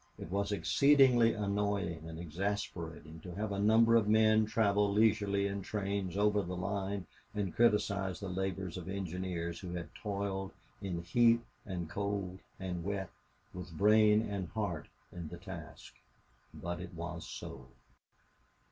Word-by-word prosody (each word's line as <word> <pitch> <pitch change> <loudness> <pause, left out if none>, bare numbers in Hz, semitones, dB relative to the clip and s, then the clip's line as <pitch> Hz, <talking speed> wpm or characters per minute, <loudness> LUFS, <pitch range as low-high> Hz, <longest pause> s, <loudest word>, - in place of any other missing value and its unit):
It 85 - -8
was 100 +1 0
exceedingly 120 - +5
annoying 100 -5 -1
and 80 - -7
exasperating 85 -2 -4
to 90 +1 -9
have 105 +1 -2
a 100 - -2
number 115 +2 +5
of 110 -3 +4
men 110 0 +5
travel 105 -2 +2
leisurely 105 -2 +3
in 100 0 -2
trains 100 -2 -2
over 105 0 +3
the 90 -1 -4
line 100 0 -2 0.3
and 100 -4 -2
criticize 100 -4 +2
the 100 - -5
labors 95 -1 -3
of 90 0 -6
engineers 90 -3 -3
who 90 -2 -6
had 85 -1 -6
toiled 100 -2 -3 0.3
in 85 -3 -3
heat 115 +7 +4 0.3
and 90 -4 -3
cold 100 +1 -3 0.2
and 90 -2 -3
wet, 95 -1 -3 0.4
with 90 -3 -8
brain 105 +1 +5
and 100 -5 -3
heart 90 -8 -3 0.2
in 85 -2 -6
the 85 - -8
task. 85 -2 -9 0.6
But 85 0 -5
it - - -8
was 85 -3 -5
so. 65 +1 -8
100 Hz, 145 wpm, -33 LUFS, 90-105 Hz, 0.6 s, exceedingly